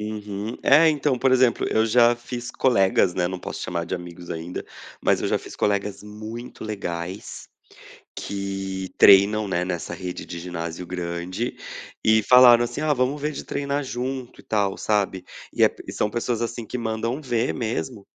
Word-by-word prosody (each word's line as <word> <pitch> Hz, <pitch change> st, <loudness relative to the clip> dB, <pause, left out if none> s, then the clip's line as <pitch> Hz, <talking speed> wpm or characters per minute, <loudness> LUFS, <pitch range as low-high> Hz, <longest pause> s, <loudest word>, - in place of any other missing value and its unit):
Uhum. 105 Hz, 0 st, -5 dB
É 155 Hz, +4 st, +6 dB
então, 145 Hz, -4 st, +1 dB
por 130 Hz, +1 st, +3 dB
exemplo, 125 Hz, -2 st, +3 dB
eu 110 Hz, -, +2 dB
já 120 Hz, +1 st, +5 dB
fiz 120 Hz, 0 st, -7 dB
colegas, 95 Hz, -7 st, +3 dB
né, 90 Hz, -1 st, +1 dB
não 95 Hz, 0 st, -4 dB
posso -, -, -6 dB
chamar 85 Hz, -2 st, -2 dB
de 90 Hz, +2 st, -3 dB
amigos 90 Hz, 0 st, -10 dB
ainda, 85 Hz, +2 st, -5 dB, 0.4 s
mas -, -, +3 dB
eu -, -, -1 dB
já -, -, +1 dB
fiz -, -, -11 dB
colegas 100 Hz, 0 st, -1 dB
muito 110 Hz, +3 st, -8 dB
legais 95 Hz, -3 st, -5 dB, 0.7 s
que 95 Hz, -1 st, -4 dB
treinam, 100 Hz, +2 st, +6 dB
né, 90 Hz, -1 st, 0 dB
nessa 90 Hz, -3 st, -4 dB
rede 90 Hz, -1 st, -6 dB
de 85 Hz, -, -7 dB
ginásio 85 Hz, 0 st, -5 dB
grande 90 Hz, +5 st, -4 dB, 0.5 s
e 110 Hz, -1 st, +4 dB
falaram 125 Hz, -1 st, +8 dB
assim: 120 Hz, -, -4 dB
"Ah, 155 Hz, -1 st, +2 dB
vamo 130 Hz, +3 st, 0 dB
ver 150 Hz, +1 st, -3 dB
de -, -, -6 dB
treinar 140 Hz, 0 st, -2 dB
junto 130 Hz, 0 st, -5 dB
e -, -, -14 dB
tal", 100 Hz, -3 st, 0 dB
sabe, 100 Hz, -3 st, 0 dB, 0.3 s
e -, -, -3 dB
é -, -, +7 dB, 0.2 s
e -, -, -6 dB
são 105 Hz, -, 0 dB
pessoas 120 Hz, +1 st, -2 dB
assim 115 Hz, -1 st, -3 dB
que 125 Hz, -, -5 dB
mandam 115 Hz, +4 st, -2 dB
ver 120 Hz, -3 st, 0 dB
mesmo. 115 Hz, -2 st, -4 dB
110 Hz, 175 wpm, -24 LUFS, 95-120 Hz, 0.7 s, falaram